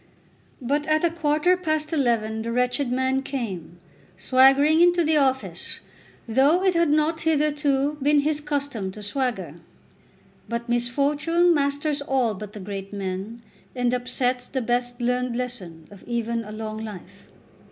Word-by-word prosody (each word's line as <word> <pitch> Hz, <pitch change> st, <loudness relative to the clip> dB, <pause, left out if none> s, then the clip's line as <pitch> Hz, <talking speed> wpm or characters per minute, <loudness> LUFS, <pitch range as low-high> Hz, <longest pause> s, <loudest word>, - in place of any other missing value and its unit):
But 290 Hz, +4 st, 0 dB
at 310 Hz, +1 st, +2 dB
a 340 Hz, -, +3 dB
quarter 315 Hz, +2 st, +2 dB
past 310 Hz, -3 st, -2 dB
eleven 230 Hz, -6 st, 0 dB
the 230 Hz, +1 st, -3 dB
wretched 250 Hz, +2 st, 0 dB
man 260 Hz, +1 st, +1 dB
came, 205 Hz, -, -5 dB, 0.4 s
swaggering 270 Hz, -, +5 dB
into 350 Hz, 0 st, +5 dB
the 315 Hz, 0 st, +2 dB
office, 265 Hz, -2 st, +1 dB, 0.5 s
though 280 Hz, +10 st, +3 dB
it 375 Hz, -1 st, +3 dB
had 335 Hz, -2 st, +2 dB
not, 310 Hz, +2 st, +1 dB
hitherto, 295 Hz, -2 st, +1 dB
been 290 Hz, +1 st, +4 dB
his 300 Hz, +1 st, -1 dB
custom 280 Hz, -9 st, -3 dB
to 210 Hz, -, -9 dB
swagger. 250 Hz, +3 st, -2 dB, 0.9 s
But 235 Hz, +1 st, -3 dB
misfortune 285 Hz, +8 st, +2 dB
masters 285 Hz, 0 st, 0 dB
all 265 Hz, -5 st, +1 dB
but 210 Hz, +1 st, -8 dB
the 210 Hz, -, -8 dB
great 195 Hz, 0 st, -6 dB
men, 200 Hz, +3 st, -5 dB, 0.3 s
and 245 Hz, -1 st, 0 dB
upsets 250 Hz, 0 st, -1 dB
the 260 Hz, -2 st, -3 dB
best 245 Hz, +1 st, -1 dB
learned 250 Hz, 0 st, 0 dB
lesson 195 Hz, -11 st, -6 dB
of 200 Hz, -, -13 dB
even 235 Hz, -1 st, -2 dB
a 210 Hz, -, -9 dB
long 215 Hz, 0 st, -5 dB
life. 210 Hz, -5 st, -10 dB
260 Hz, 145 wpm, -24 LUFS, 230-295 Hz, 0.9 s, swaggering